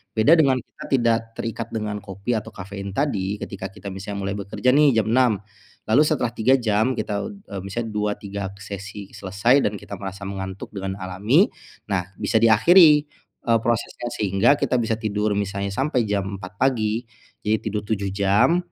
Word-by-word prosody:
Beda 110 +8 +5
dengan 135 -4 +4
kita 120 - -13
tidak 115 -4 +3 0.2
terikat 115 0 -4
dengan 105 -2 -3
kopi 100 +5 -5
atau 110 -2 -2
kafein 100 +1 -7
tadi, 105 -9 0
ketika 95 -1 -5
kita 100 0 -8
misalnya 100 +1 -6
mulai 100 +1 -2
bekerja 100 +6 0
nih 145 -4 +5
jam 110 - +3
6.00, 120 -5 +3 0.4
lalu 130 +7 +4
setelah 125 -6 0
3 125 +3 +3
jam 115 +1 +1
kita, 100 -3 -2
eee, 100 - -8
misalnya 105 +4 -4
2, 105 0 0
3 100 -1 -5
sesi 100 +1 -8
selesai 100 +8 +2
dan 105 - -3
kita - - -10
merasa 95 0 -7
mengantuk 95 0 -6
dengan 95 -1 -4
alami. 100 - +2 0.4
Nah, 90 -2 0
bisa 110 - +1
diakhiri, 150 - +7 0.4
eee, 115 -1 +4
prosesnya, 120 +1 -2
sehingga 100 +6 +3
kita 125 - +1
bisa 110 0 0
tidur 105 -1 -1
misalnya 100 0 -2
sampai 135 -1 +1
jam 100 -1 -2
4.00 90 +1 -9
pagi, 115 -3 +1 0.4
jadi 110 +1 +2
tidur 105 -1 -3
7 100 -2 -1
jam. 105 - +3
105 Hz, 170 wpm, -23 LUFS, 100-120 Hz, 0.4 s, diakhiri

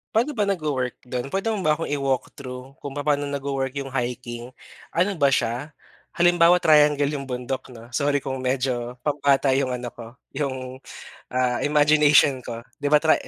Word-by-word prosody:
Pa'no 245 +7 +3
ba 210 -6 0
nagwo-work 150 -9 -1 0.2
do'n? 125 +1 -2
Pwede 195 +8 -1
mo 210 - -2
ba 155 -4 +2
akong 165 - -4
i-walk 135 -3 -1
through 130 0 -8
kung 140 -1 -7
papaano 145 0 0
nagwo-work 140 -1 -3
yung 135 - -9
hiking? 120 -1 -4 0.5
Ano 185 +4 +2
ba 140 - +5
siya, 130 +3 -1 0.4
halimbawa 175 0 +5
triangle 150 -4 +4
yung 135 - -7
bundok 125 +1 -4
'no 120 -1 -13
sorry 140 +2 0
kung 135 -1 -3
medyo 125 -1 -1
pambata 140 -2 +2
yung 130 -1 +1
ano 120 0 -6
ko 120 0 -11 0.2
yung, 130 -2 -4 0.5
ah, 125 -1 0
imagination 145 -2 +4
ko. 115 -1 -6 0.2
Di 145 - -3
ba, 150 - +7
tri 160 +1 +4
140 Hz, 165 wpm, -24 LUFS, 125-150 Hz, 0.5 s, ba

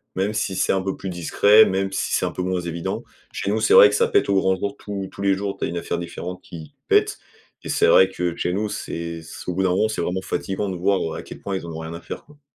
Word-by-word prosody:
même 100 +3 0
si 110 -4 -1
c'est - - +1
un 95 - +1
peu 95 0 -3
plus 95 - -6
discret, 100 +5 +5
même 95 +1 -1
si 95 - -2
c'est - - +1
un - - -2
peu - - -5
moins 90 -1 -1
évident. 85 -1 -4 0.3
Chez 100 - -3
nous, 110 - +1
c'est 110 - +3
vrai 105 - +10
que 105 - -1
ça - - +3
pète - - +2
au 100 - +3
grand 95 0 +3
jour. 100 +2 -3
Tous 100 -2 -5
tous 100 - -10
les 100 -1 +3
jours, 100 +1 -3
tu - - -2
as - - -1
une 85 - -4
affaire 85 - -2
différente 90 +1 -6
qui 80 -3 -11
pète - - +3 0.4
et - - -7
c'est - - +3
vrai 95 0 +6
que 90 -2 -2
chez 90 - -1
nous, 105 +2 -1
c'est 85 -3 -5
s 80 - -11
au 90 - -1
bout 95 +2 0
d'un 95 - +2
moment, 95 +5 +2
c'est 110 - -2
vraiment 95 +1 -2
fatiguant 95 +1 -3
de 95 - -3
voir, 95 +2 +2
heu, 80 - -3
à - - -7
quel - - -10
point, 100 -1 -3
ils 85 - -7
en 85 - -6
ont 80 - -6
rien 80 +1 -6
à 85 - -7
faire, - - -7
quoi. 150 0 -20
95 Hz, 300 wpm, -22 LUFS, 85-100 Hz, 0.4 s, vrai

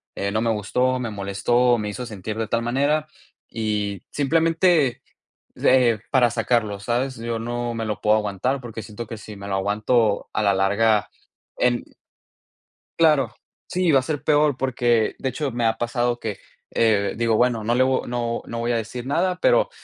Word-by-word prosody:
eh, 100 0 -2
no 110 - 0
me 115 - +1
gustó, 125 +5 0
me 115 -3 -3
molestó, 105 +5 +1
me 105 -1 -3
hizo 125 +4 -5
sentir 105 0 -6
de 110 - -1
tal 115 +1 0
manera". 145 +5 +1 0.4
Y 105 -3 -2
simplemente, 160 -1 +2 0.6
eh, 125 -4 +4
para 125 -4 +3
sacarlo, 110 -4 0
¿sabes? 125 +5 -1
Yo 115 0 -3
no 120 +1 -3
me 115 - -3
lo 105 -1 -4
puedo 105 0 +4
aguantar, 110 +6 -1
porque 115 -2 -7
siento 110 +2 -8
que 115 - -7
si 105 0 -10
me 100 0 -9
lo 100 - -1
aguanto 105 +2 +1
a - - 0
la 100 - +3
larga 105 +2 +2 0.5
en 120 -1 +1 1.2
Claro, 150 -8 +4 0.4
sí, 180 -2 +1
va 135 - +6
a - - -2
ser 145 +2 -4
peor, 150 -3 +3
porque 120 -4 +1
de 130 - -1
hecho 145 +1 -3
me 120 0 -1
ha 110 0 +1
pasado 120 0 -1
que, 105 -4 -5 0.3
eh, 105 -3 +2
digo: 115 0 +1
"Bueno, 120 -2 +2
no 115 +2 +1
le 130 - +4
vo 130 0 0
no 120 -1 -2
no 115 - -5
voy 115 +1 -1
a - - +1
decir 120 +3 -5
nada", 180 +6 0
pero - - +3
120 Hz, 185 wpm, -23 LUFS, 110-130 Hz, 1.2 s, va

